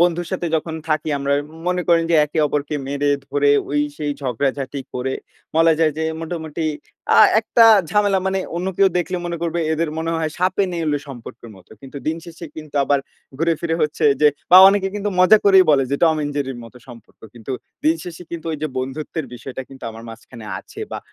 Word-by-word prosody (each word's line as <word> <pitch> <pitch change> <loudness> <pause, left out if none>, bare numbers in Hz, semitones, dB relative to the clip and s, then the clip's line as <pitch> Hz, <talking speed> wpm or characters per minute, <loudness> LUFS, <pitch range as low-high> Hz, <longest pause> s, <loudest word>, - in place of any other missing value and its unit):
বন্ধুর 175 0 +1
সাথে 175 -2 -2
যখন 160 +1 -4
থাকি, 155 0 0
আমরা 140 0 -1
উম 155 +2 -14
মনে 180 0 0
করেন 165 -1 +4
যে 165 - +4
একে 150 +2 -5
অপরকে 145 +1 -2
মেরে 145 +1 0 0.2
ধরে, 145 +1 +2 0.2
ওই 145 0 +1 0.2
সেই 150 -1 -2
ঝগড়াঝাটি 135 +1 -2
করে, 130 +1 -2 0.4
বলা 165 0 +5
যায় 160 -2 +3
যে 160 - -1 0.2
মোটামুটি 160 -1 -5 0.5
আ - - +7 0.2
একটা 230 +1 +4 0.3
ঝামেলা 205 -2 +2
মানে 190 0 0 0.2
অন্য 180 - -3
কেউ 195 - +5
দেখলে 180 +1 -2
মনে 170 0 -3
করবে 170 0 -1
এদের 160 0 -1
মনে 165 +1 -2
হয় 160 -1 -1
সাপে 185 +2 +1
নেউলে 155 -4 -1
সম্পর্কের 120 -2 -10
মতো। 90 - -20
কিন্তু 135 +1 -11
দিন 160 - 0
শেষে 170 0 -10
কিন্তু 155 -2 -10
আবার 140 0 +2 0.4
ঘুরে 165 +1 +2
ফিরে 165 -1 -1
হচ্ছে 150 0 -1 0.2
যে 150 - +7 0.2
বা, 180 - +9
অনেকে 195 -1 +1
কিন্তু 205 0 -2
মজা 210 +4 +7
করেই 190 -2 +7
বলে 135 -2 +4
যে 140 - +1
টম 160 -1 +3
অ্যান্ড 145 -1 -2
জেরির 135 -3 -3
মতো 115 +2 -14
সম্পর্ক। 120 -2 -15
কিন্তু 120 +2 -7 0.3
দিনশেষে 165 +2 -1
কিন্তু 170 -1 -6
ওইযে 155 0 -3
বন্ধুত্বের 145 +4 -4
বিষয়টা 130 +2 -7
কিন্তু 135 -1 -12
আমার 115 0 -11
মাঝখানে 115 0 -11
আছে - - -12
বা - - -4
155 Hz, 195 wpm, -20 LUFS, 140-170 Hz, 0.5 s, বা